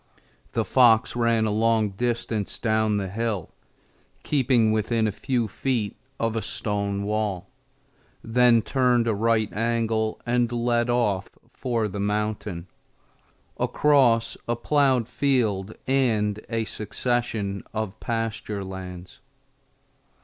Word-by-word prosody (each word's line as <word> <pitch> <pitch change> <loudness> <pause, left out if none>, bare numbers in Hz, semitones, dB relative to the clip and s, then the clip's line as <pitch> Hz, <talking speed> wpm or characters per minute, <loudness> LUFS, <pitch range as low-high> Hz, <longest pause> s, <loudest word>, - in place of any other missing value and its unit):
The - - 0
fox 120 -4 +4
ran 115 -2 +2
a 110 - 0
long 110 0 +2
distance 115 -1 -2
down 110 -2 +1
the 100 -1 -2
hill, 105 -2 -3 0.7
keeping 125 -6 +2
within 110 +1 +1
a 110 - +1
few 120 0 -1
feet 115 0 -2 0.2
of 115 -1 0
a 115 - 0
stone 100 -2 -2
wall; 100 -3 -2 0.7
then 115 -1 +4
turned 125 -3 +2
a 115 - +2
right 110 0 +1
angle 115 0 0
and 120 0 +1
led 120 0 +1
off 105 -6 +1 0.2
for 120 -4 -1
the 100 0 -6
mountain, 105 -3 -2 0.9
across 125 -6 +3
a 120 - +1
plowed 130 -2 +2
field 115 -6 0
and 110 -6 +1
a 115 -1 0
succession 110 -2 -2
of 110 -1 -4
pasture 115 -3 -3
lands. 90 -1 -8
115 Hz, 115 wpm, -25 LUFS, 105-120 Hz, 0.9 s, fox